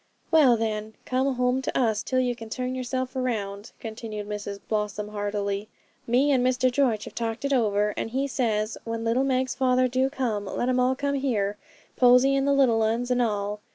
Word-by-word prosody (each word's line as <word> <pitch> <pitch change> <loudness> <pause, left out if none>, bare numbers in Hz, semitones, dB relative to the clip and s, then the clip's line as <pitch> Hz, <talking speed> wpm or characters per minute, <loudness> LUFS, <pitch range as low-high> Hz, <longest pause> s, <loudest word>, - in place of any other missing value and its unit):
'Well, 285 -7 +6
then, 220 -1 -3
come 260 +1 0
home 250 +1 +1
to - - -2
us 220 -4 +1
till 255 - 0
you 250 -1 0
can 225 -1 -10
turn 255 +2 -3
yourself 255 0 -3
round,' 220 -5 -3
continued 220 -2 -6
Mrs 205 -1 -5
Blossom 210 -1 -2
heartily; 205 0 -3 0.4
'me 260 +5 +3
and 255 -3 +3
Mr 255 0 +2
George 245 -5 +1
have - - -9
talked 230 +2 -3
it 280 - +1
over, 210 -4 +2
and - - -3
he 265 +4 -1
says, 220 -5 -1
"When 230 0 -4
little 230 +3 +2
Meg's 260 -1 0
father 255 -1 +2
do 260 +2 +1
come, 240 -7 -2
let 240 +5 -2
'em 255 0 +2
all 255 +1 +2
come 280 +1 -1
here: 225 -8 0 0.4
Posy, 250 +2 +5
and 275 0 +1
the - - +3
little 250 -5 +3
'uns, 230 +3 0
and 250 0 +2
all. 210 -2 -1
245 Hz, 195 wpm, -26 LUFS, 215-255 Hz, 0.4 s, Well